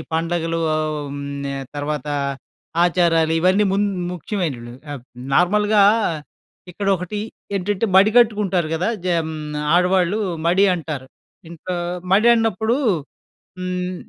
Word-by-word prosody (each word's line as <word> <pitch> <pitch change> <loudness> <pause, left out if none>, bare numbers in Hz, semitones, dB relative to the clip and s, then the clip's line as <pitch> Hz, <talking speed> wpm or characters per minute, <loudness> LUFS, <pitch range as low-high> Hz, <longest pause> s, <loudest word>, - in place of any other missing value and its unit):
పండుగలు 165 0 -1
హ్మ్, 145 -2 -3 0.3
తర్వాత 145 -1 -3 0.8
ఆచారాలు 165 -2 +2
ఇవన్నీ 185 +4 +3
ము - - +1 0.4
ముఖ్యమైనవి. 155 - -4 0.2
ఆహ్, 140 - -7 0.3
నార్మల్‍గా 205 +3 +4 0.9
ఇక్కడొకటి 195 +1 -1 0.4
ఏంటంటే, 200 +3 -1
మడి 200 +3 +6
కట్టుకుంటారు 205 -8 +3
కదా! 175 +5 0 0.2
జ - - -3 0.2
హ్మ్, 160 0 -5 0.4
ఆడవాళ్ళు 180 +2 +3 0.3
మడి 185 +4 +4
అంటారు. 150 -6 -5 0.4
ఇంట్లో 170 +2 -5 0.4
మడి 215 +4 +5
అన్నప్పుడు 225 +1 +1 0.8
హ్మ్, 180 0 -3
180 Hz, 100 wpm, -21 LUFS, 160-195 Hz, 0.9 s, మడి